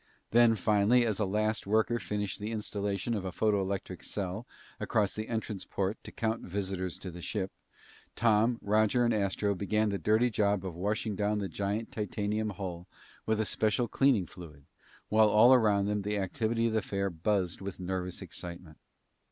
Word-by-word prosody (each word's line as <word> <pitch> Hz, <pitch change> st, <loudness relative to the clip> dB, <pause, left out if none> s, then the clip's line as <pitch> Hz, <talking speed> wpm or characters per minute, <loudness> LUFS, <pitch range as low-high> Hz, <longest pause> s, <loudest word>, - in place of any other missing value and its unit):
Then, 120 Hz, 0 st, +6 dB
finally, 105 Hz, +4 st, +3 dB
as 110 Hz, -3 st, 0 dB
a 105 Hz, -, +2 dB
last 105 Hz, +2 st, -1 dB
worker 110 Hz, +3 st, +2 dB
finished 105 Hz, +1 st, -3 dB
the 105 Hz, +2 st, -4 dB
installation 105 Hz, 0 st, -2 dB
of 105 Hz, -4 st, -2 dB
a 95 Hz, -, -3 dB
photoelectric 100 Hz, -2 st, -1 dB
cell 100 Hz, +4 st, -4 dB, 0.3 s
across 105 Hz, -2 st, +1 dB
the 110 Hz, 0 st, -4 dB
entrance 110 Hz, -4 st, -3 dB
port 100 Hz, +2 st, -3 dB
to -, -, -9 dB
count 110 Hz, 0 st, -1 dB
visitors 95 Hz, -1 st, -3 dB
to 90 Hz, -, -7 dB
the 90 Hz, +1 st, -9 dB
ship, 95 Hz, +1 st, -3 dB, 0.6 s
Tom, 115 Hz, +1 st, +3 dB
Roger, 110 Hz, +4 st, +3 dB
and 120 Hz, -, +2 dB
Astro 100 Hz, 0 st, 0 dB
began 105 Hz, +3 st, 0 dB
the 100 Hz, -1 st, -2 dB
dirty 110 Hz, +3 st, +3 dB
job 100 Hz, -2 st, +1 dB
of 95 Hz, -, -4 dB
washing 105 Hz, +4 st, -2 dB
down 105 Hz, +2 st, 0 dB
the 100 Hz, -1 st, -2 dB
giant 100 Hz, +5 st, -3 dB
titanium 105 Hz, +1 st, -2 dB
hull 90 Hz, -3 st, -6 dB, 0.4 s
with 110 Hz, 0 st, +1 dB
a 110 Hz, -, +1 dB
special 110 Hz, +3 st, +1 dB
cleaning 130 Hz, -9 st, +3 dB
fluid, 75 Hz, -5 st, -12 dB, 0.4 s
while 110 Hz, 0 st, +5 dB
all 110 Hz, +5 st, +7 dB
around 105 Hz, -5 st, +4 dB
them 105 Hz, 0 st, 0 dB
the 105 Hz, +1 st, -1 dB
activity 110 Hz, +4 st, 0 dB
of 115 Hz, -, +1 dB
the 110 Hz, -, +2 dB
fair 100 Hz, -1 st, -2 dB
buzzed 90 Hz, +1 st, -1 dB
with 95 Hz, -1 st, -6 dB
nervous 90 Hz, 0 st, -3 dB
excitement. 85 Hz, -2 st, -8 dB
105 Hz, 175 wpm, -30 LUFS, 95-110 Hz, 0.6 s, all